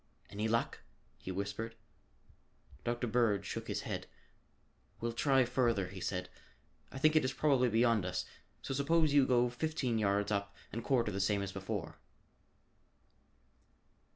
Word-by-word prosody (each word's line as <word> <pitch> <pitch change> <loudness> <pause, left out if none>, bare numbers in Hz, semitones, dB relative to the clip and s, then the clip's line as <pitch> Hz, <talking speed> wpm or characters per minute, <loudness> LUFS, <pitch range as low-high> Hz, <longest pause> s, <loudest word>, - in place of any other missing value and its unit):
"Any 105 +2 -1
luck?" 115 +1 0 0.4
he 95 - -6
whispered. 100 +4 -4 1.1
Dr. 120 +1 -1
Bird 110 -4 +2
shook - - -5
his - - -2
head. - - -4 0.9
"Well 115 0 -1
try 135 +2 +3
further," 115 -7 +1
he 95 -1 -8
said. 90 0 -2 0.6
"I - - -7
think 155 +3 +4
it 155 - +5
is 130 - 0
probably 135 -5 +3
beyond 115 -2 +3
us, 90 0 -2 0.4
so - - -3
suppose 150 +2 +2
you 140 -2 +5
go 125 -1 +4
fifteen 130 -3 -1
yards 100 0 +1
up 100 -1 -1 0.2
and 115 +1 -3
quarter 120 -5 +2
the 100 - -3
same 100 0 +1
as 100 - -4
before." 95 -1 -5
115 Hz, 145 wpm, -34 LUFS, 100-130 Hz, 1.1 s, it